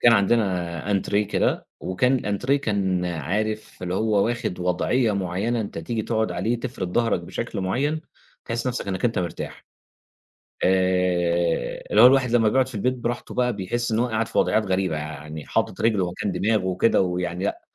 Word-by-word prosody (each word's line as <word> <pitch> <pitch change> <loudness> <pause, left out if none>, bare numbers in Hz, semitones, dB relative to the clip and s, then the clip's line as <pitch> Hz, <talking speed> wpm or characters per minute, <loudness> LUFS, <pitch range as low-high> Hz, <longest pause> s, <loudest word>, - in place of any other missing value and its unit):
كان 120 - +6
عندنا 95 -5 +1
أنتريه 100 +1 +1
كده - - 0
وكان 125 +8 +1
الأنتريه 125 +3 0
كان 100 -8 0
عارف 100 +8 -3
اللي 90 0 -2
هو 105 0 +2
واخِد 115 -6 -2
وضعيّة 105 +7 +1
معيّنة 100 +5 -1
أنت 100 -5 -5
تيجي 110 +7 -3
تقعُد 110 0 0
عليه 120 +1 -1
تفرِد 95 -7 -4
ضهرك 115 -5 +2
بشكل 100 +4 -5
معيّن، 140 +12 0 0.4
تحِس 115 +1 -3
نَفْسك 125 -5 -2
إنّك 95 +2 -2
أنت 120 -1 +1
مرتاح، 85 -3 -5 1.0
آآ، 90 -4 +1
اللي 105 - +5
هو - - +11
الواحد 130 -1 +4
لمّا 115 -2 +4
بيقعُد 130 +3 +2
في 130 - -11
البيت 125 +5 0
براحته 120 -1 -4
بقى 125 -1 +1
بيحِس 115 +5 -2
إن 110 - +1
هو 120 - +2
قاعد 110 -1 -1
في - - -2
وضعيّات 110 -1 +2
غريبة، 95 -4 0
يعني 75 0 -7
حاطط - - -1
رجله 105 -6 +2
مكان 95 +2 -3
دماغه 105 -2 +1
وكده 95 +5 +2
ويعني 90 0 -2
لأ، - - -2
100 Hz, 170 wpm, -24 LUFS, 90-115 Hz, 1.0 s, هو